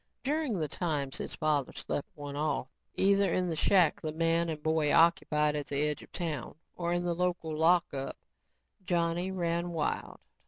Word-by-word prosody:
During 290 -5 0
the 155 -3 -1
times 145 -4 -2
his - - -5
father 150 -3 0
slept 145 - -4
one 145 -2 -7
off, 145 -3 -1 0.3
either 200 0 +3
in 180 0 +1
the 165 - -1
shack 175 +1 +3
the 155 - -3
man 165 +1 +1
and 155 -2 -5
boy 160 -2 +2
occupied 150 -3 +4
at 145 -1 -3
the 140 - -3
edge 150 -1 -1
of - - -15
town, 160 -7 -4 0.2
or 170 -1 -2
in 175 0 +1
the 175 -1 0
local 175 -2 -1
lockup, 160 -4 +2 0.7
Johnny 175 0 0
ran 170 -2 -1
wild. 165 -3 -2
165 Hz, 170 wpm, -31 LUFS, 150-175 Hz, 0.7 s, occupied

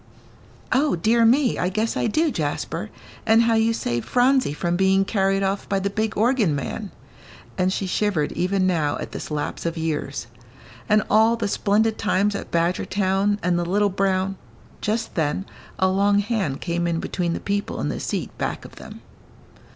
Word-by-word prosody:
"O 280 0 +3
dear 225 +7 +3
me, 255 +2 +3
I 180 - +1
guess 215 +4 -1
I - - 0
do, 310 +8 +1
Jasper, - - -3 0.3
and 225 +1 +5
how 230 0 +2
you 225 0 +3
saved 120 - -2
Phronsie 255 - +3
from 170 +4 -1
being 190 +1 +3
carried 195 -1 +1
off 195 +1 -2
by 195 - +1
the 195 +1 -2
big 220 +1 -2
organ 220 - +2
man," 195 +9 -4 0.7
and 185 0 +1
she 195 - -2
shivered 185 -5 0
even 185 +1 0
now 160 -5 +1
at - - -6
this - - -6
lapse 150 -1 -3
of 170 0 -2
years. 155 -5 -3 0.6
"And 210 0 +4
all 220 +2 +4
the 230 -3 -2
splendid 215 +2 +1
times 205 -1 +1
at 200 - -5
Badgertown 190 +4 +1
and 175 0 +1
the - - 0
little 200 +4 +2
brown 190 0 0 0.2
" - - -26
Just 220 +2 -2
then 160 +4 -1 0.3
a 190 - +3
long 200 +2 +3
hand 205 - -1
came 170 0 -1
in 165 -1 0
between 175 -1 -2
the - - -3
people 200 0 -2
in - - -1
the - - -3
seat - - -4
back - - -3
of - - -13
them. - - -11
195 Hz, 180 wpm, -23 LUFS, 175-220 Hz, 0.7 s, and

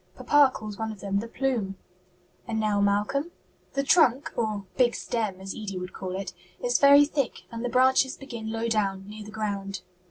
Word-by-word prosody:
Papa 290 -2 +5
calls 215 -3 -7
one 220 0 -2
of 210 - -10
them 200 0 -1
'the 230 - -5
plume.'" 230 -6 -1 0.7
"And 225 -1 -1
now 210 -2 +1
Malcolm?" 210 +10 +1 0.4
"The 275 - 0
trunk 275 -3 +4
or 215 -3 -2
big 245 -3 +3
'stem,' 215 -5 -2
as 190 0 -6
Edie 200 -3 -5
would 180 0 -6
call 185 -1 -5
it 195 - -5 0.3
is 245 0 +1
very 285 +1 +8
thick, 285 -4 -2
and 230 0 -5
the 245 - -1
branches 260 +2 +3
begin 235 -5 -6
low 225 +1 -2
down, 195 -3 0
near 210 +1 -8
the 210 - -10
ground." 200 -2 -4
220 Hz, 190 wpm, -27 LUFS, 200-255 Hz, 0.7 s, very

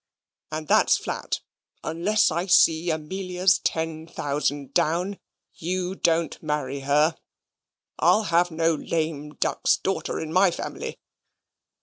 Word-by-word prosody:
And 155 0 -4
that's - - +4
flat - - -4 0.4
unless 185 +5 +2
I 170 +4 -1
see 175 -2 +4
Amelia's 180 +4 +1
ten 160 0 -2
thousand 145 -3 -2
down 180 +5 0 0.3
you 180 +2 -3
don't 165 -3 0
marry 150 -3 -2
her. 150 +4 +2 0.8
I'll 220 - +4
have 175 -2 +2
no 165 0 +1
lame 155 -2 -3
duck's - - +1
daughter 195 - -2
in 160 0 -5
my 185 +2 +5
family. - - -5
165 Hz, 115 wpm, -25 LUFS, 150-180 Hz, 0.8 s, my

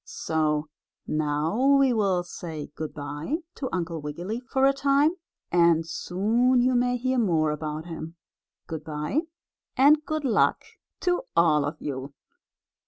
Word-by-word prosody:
So 155 -1 -1 0.4
now 155 - +2
we 270 -2 +4
will 195 -5 +1
say 160 -4 -7
good 155 0 -5
by 145 - -4 0.2
to 260 - -4
Uncle 170 -3 -3
Wiggily 175 +10 -4
for 265 +2 0
a 275 - +5
time, 280 +2 +3 0.4
and 170 -2 +4
soon 225 +10 +1
you 255 +1 +3
may 245 0 +2
hear 255 +1 0
more 160 -8 +2
about 150 +1 -4
him. 165 -1 -7 0.5
Good 160 -1 -6
by 150 - -2 0.6
and 295 +3 +6
good 310 0 -3
luck 245 - +2 0.4
to 355 -1 +1 0.2
all 155 -4 +4
of 145 - -4
you. 135 0 -5
175 Hz, 140 wpm, -26 LUFS, 155-255 Hz, 0.6 s, and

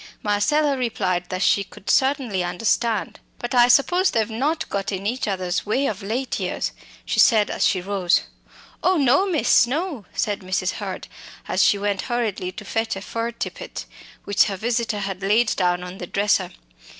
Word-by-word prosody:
Marcella 275 +9 +2
replied 185 -8 -1
that 185 +1 -2
she 200 - +3
could 195 - -16
certainly 265 -9 +2
understand. 210 +5 -1 0.2
"But 240 - -5
I 245 -1 +6
suppose 350 +10 +4
they've 220 -2 +1
not 305 +8 -1
got 200 +1 -3
in 195 0 -4
each 240 +4 -1
other's 185 -2 -1
way 255 +7 0
of 215 -5 -2
late 235 +7 -2
years," - - -2 0.3
she - - -1
said 215 -4 +5
as - - +2
she 185 - 0
rose 185 -2 +1
to - - +2
go. - - -17 0.7
"Oh! - - +1
no, 290 +8 +3
miss, 310 -8 +4
no," 285 - -3
said 205 -3 -1
Mrs. 185 0 -1
Hurd - - -6 0.4
as - - +2
she 205 - +4
went 200 -1 -1
hurriedly 220 -7 -1
to 210 +3 -10
fetch 225 +1 -1
a 195 - -6
fur 230 +3 -3
tippet - - -6 0.4
which 200 0 +3
her 195 -2 -3
visitor 230 -1 -1
had 195 -1 -4
laid 215 +4 +2
down 180 -1 +1
on 180 +2 -8
the 180 - -6
dresser. 205 +3 +1
210 Hz, 185 wpm, -23 LUFS, 195-245 Hz, 0.7 s, I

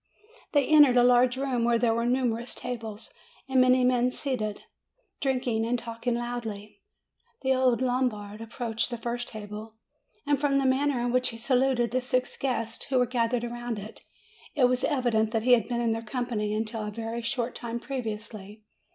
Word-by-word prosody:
They 285 -3 +4
entered 295 -4 +6
a 245 - +6
large 245 +1 +4
room, 260 -3 0
where 235 0 +3
there 230 -1 +2
were 235 +1 0
numer 245 -2 +1
ous 240 - -8
tables, 225 -3 -6 0.3
and 265 -1 +4
many 255 0 +5
men 250 0 +3
seated, 245 -6 -3 0.6
drinking 255 -5 0
and 240 +2 0
talk 230 0 -8
ing 240 - +3
loudly. 220 -4 -5 0.6
The 265 0 +3
old 255 -2 +2
Lombard 225 -5 -1
approached 225 0 -2
the 240 - -4
first 240 +1 -4
table, 215 +1 -8 0.5
and 285 -1 +1
from 280 -2 +2
the 275 - +1
manner 265 0 +2
in 240 0 0
which 255 +1 +2
he 230 - -7
saluted 250 0 +1
the 255 +1 +1
six 255 0 -1
guests 230 -4 -2
who 270 - 0
were 250 - +4
gathered 240 -1 0
around 240 -1 -4
it, 210 +2 -9 0.5
it 285 - +2
was 250 +1 +1
evident 240 -6 +1
that 225 -1 0
he 250 - +3
had 230 -2 +3
been 240 -1 -1
in 230 -1 +1
their 225 0 -1
company 230 -2 -2
until 220 +1 -2
a 225 +2 -4
short 240 0 -2
time 235 -1 -5
previously. 215 -5 -6
240 Hz, 185 wpm, -27 LUFS, 225-255 Hz, 0.6 s, entered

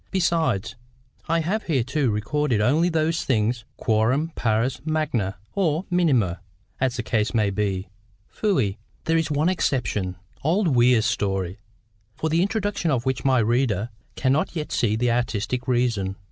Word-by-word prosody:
Besides, 160 - 0 0.5
I 165 +1 +2
have 195 +7 -1
hitherto 135 -2 +1
recorded 115 +4 0
only 150 +11 +3
those 165 0 0
things 115 -1 0
"quorum 125 +9 +1
pars 120 +2 0
magna"—or 155 - -1
minima, 130 - +2 0.4
as 130 -1 +1
the 120 - -3
case 110 +1 0
may 105 -3 +2
be—"fui." 100 - -2 0.2
There 165 0 +2
is 160 - -1
one 150 +2 +1
exception, 110 - 0 0.3
old 175 +5 +2
Weir's 120 -3 +4
story, 95 -4 -1 0.6
for 160 - -2
the 165 +2 +3
introduction 205 -3 0
of 130 -4 0
which 130 -2 -1
my 130 -1 +3
reader 115 -2 +1 0.2
cannot 135 +6 +1
yet 155 -2 -4
see 110 -3 +1
the 120 +1 +1
artistic 120 +1 -1
reason. 115 -6 +1
125 Hz, 135 wpm, -24 LUFS, 105-155 Hz, 0.6 s, Weir's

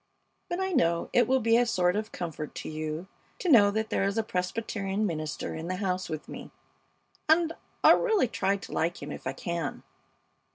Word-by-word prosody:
But 350 - -2
I 380 0 -1
know 170 - +1
it 245 - +4
will 265 +1 +3
be 230 +1 +4
a 245 - +4
sort 180 -4 +2
of 215 +1 -3
comfort 160 -3 -5
to - - -6
you 155 +2 -4 0.3
to 365 - -2
know 205 -6 +8
that 220 +1 -2
there - - +1
is 200 +2 0
a 225 - +2
Presbyterian 195 +1 -2
minister 155 -6 -3
in 160 +1 -5
the 185 - -1
house 185 -1 -2
with 155 -1 -5
me, - - -8 0.8
and 325 +1 +4 0.3
I'll - - +8
really 440 - +2
try 195 -2 0
to 195 - -10
like 170 +2 -1
him - - -6
if - - -6
I - - -1
can. 170 -4 -4
195 Hz, 200 wpm, -28 LUFS, 170-230 Hz, 0.8 s, know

